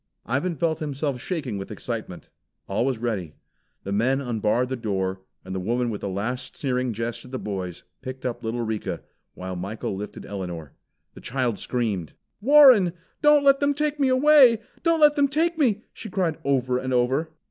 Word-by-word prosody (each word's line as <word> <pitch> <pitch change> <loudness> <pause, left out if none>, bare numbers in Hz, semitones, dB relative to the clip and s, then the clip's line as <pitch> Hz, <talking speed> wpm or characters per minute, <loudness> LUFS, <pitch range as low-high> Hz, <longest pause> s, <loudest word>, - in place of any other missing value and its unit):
Ivan 140 - -1
felt 160 +1 0
himself 140 -3 -3
shaking 140 - -3
with 95 - -7
excitement. - - -6 0.4
All 100 +5 0
was 130 -3 0
ready. 105 -9 -3 0.5
The 100 - -5
men 125 +7 +2
unbarred 120 -1 0
the 130 - -1
door, 95 -5 -2 0.2
and 95 - -6
the 95 - -2
woman 120 +5 0
with 105 - -5
a - - -3
last 120 +7 -4
sneering 125 -2 -1
jest 115 +1 -4
at 125 - -12
the 130 - -4
boys, 95 -6 -5 0.2
picked 130 -1 -7
up 125 -1 -3
little 115 +2 -2
Rika, 110 -2 -3 0.3
while 95 0 -5
Michael 95 +3 -4
lifted 105 +2 -7
Elinor. 90 -7 -6 0.4
The - - -12
child 125 -4 -1
screamed. 105 -10 -2 0.3
"Warren, 255 - +7 0.3
don't 295 -1 +6
let 275 0 +5
them 285 0 +2
take 300 0 -1
me 275 - +3
away! 255 -4 +6 0.2
Don't 330 -2 +2
let 295 -1 +7
them 285 -1 +4
take 320 +4 0
me!" 225 -7 +2
she 220 - -8
cried 180 -5 -1
over 130 -2 +1
and 130 0 -3
over. 130 +6 +1
125 Hz, 180 wpm, -25 LUFS, -, 0.5 s, Warren